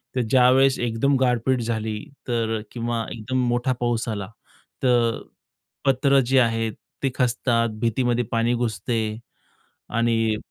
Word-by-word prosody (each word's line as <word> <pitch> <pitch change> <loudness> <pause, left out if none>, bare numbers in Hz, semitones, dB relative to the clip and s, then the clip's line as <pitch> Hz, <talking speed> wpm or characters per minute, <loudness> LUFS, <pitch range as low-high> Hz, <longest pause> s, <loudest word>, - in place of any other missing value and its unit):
तर 125 - +2
ज्यावेळेस 130 +1 +5
एकदम 120 +4 +1
गारपीट 125 0 +1
झाली 110 -2 -2 0.3
तर 115 -2 0
किंवा 120 -1 -2
एकदम 120 +3 -3
मोठा 120 +2 +1
पाऊस 120 -1 -1
आला, 100 -3 -3 0.6
तर 120 -3 +2 0.6
पत्र 135 +1 +4
जे 135 0 +4
आहेत 115 -2 +1 0.3
ते 135 - +2
खचतात, 120 -2 +1
भिंतीमध्ये 120 +1 +1
पाणी 115 +1 +1
घुसते 115 -1 -2 1.0
आणि 115 -2 +2
120 Hz, 120 wpm, -23 LUFS, 115-125 Hz, 1.0 s, ज्यावेळेस